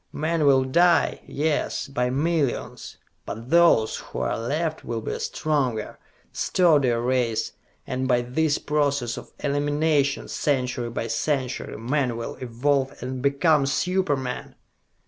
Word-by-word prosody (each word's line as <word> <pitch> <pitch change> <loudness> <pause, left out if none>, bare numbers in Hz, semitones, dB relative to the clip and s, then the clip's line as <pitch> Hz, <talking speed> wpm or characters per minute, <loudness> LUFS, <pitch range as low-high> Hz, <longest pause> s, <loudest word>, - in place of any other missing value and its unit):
Men 155 0 0
will 135 -1 +5
die, 170 +6 +3
yes, 150 +1 -1
by 125 -3 -1
millions; 145 0 -1 0.3
but 115 +4 -7
those 170 -10 +4
who - - -6
are - - 0
left 155 +7 -2
will 115 -1 -3
be 110 - -4
a - - -4
stronger, 130 -8 -1 0.3
sturdier 145 -10 +3
race, 120 -2 0 0.3
and 130 0 -2
by 125 -2 +3
this 145 +5 +1
process 140 -5 0
of - - -10
elimination, 145 0 +1
century 125 -4 -1
by 115 - -3
century, 130 +3 -2
men 125 +1 -1
will 115 - -4
evolve 130 +3 -1
and 130 0 -4
become 140 +1 +3
super 180 0 +1
men!" 125 -1 -5
140 Hz, 130 wpm, -24 LUFS, 125-150 Hz, 0.3 s, will